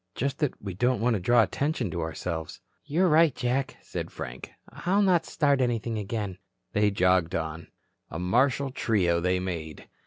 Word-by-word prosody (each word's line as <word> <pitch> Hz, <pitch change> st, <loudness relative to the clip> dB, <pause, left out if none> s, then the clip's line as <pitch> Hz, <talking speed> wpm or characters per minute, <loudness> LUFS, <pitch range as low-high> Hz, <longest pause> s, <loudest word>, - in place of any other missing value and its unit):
"Just 140 Hz, +2 st, -2 dB
that 150 Hz, -4 st, -1 dB
we 100 Hz, -2 st, -6 dB
don't 120 Hz, +6 st, +1 dB
want 120 Hz, +2 st, +2 dB
to 105 Hz, -, 0 dB
draw 120 Hz, +6 st, +4 dB
attention 135 Hz, -, -1 dB
to 85 Hz, -, -3 dB
ourselves." 80 Hz, 0 st, -4 dB, 0.2 s
"You're 165 Hz, +6 st, +2 dB
right, 160 Hz, -3 st, +5 dB
Jack," 130 Hz, +2 st, -1 dB
said -, -, -5 dB
Frank. 60 Hz, +1 st, -7 dB, 0.2 s
"I'll 180 Hz, -, +1 dB
not 180 Hz, -4 st, +3 dB
start 145 Hz, -3 st, +2 dB
anything 115 Hz, -2 st, -1 dB
again." 100 Hz, -2 st, -4 dB, 0.3 s
They 105 Hz, 0 st, +3 dB
jogged 90 Hz, -3 st, +2 dB
on. 80 Hz, 0 st, -4 dB, 0.4 s
A 80 Hz, -, -6 dB
martial 130 Hz, +10 st, +1 dB
trio 95 Hz, -9 st, +1 dB
they 90 Hz, +1 st, +1 dB
made. 85 Hz, -4 st, -5 dB
110 Hz, 165 wpm, -27 LUFS, 90-135 Hz, 0.4 s, right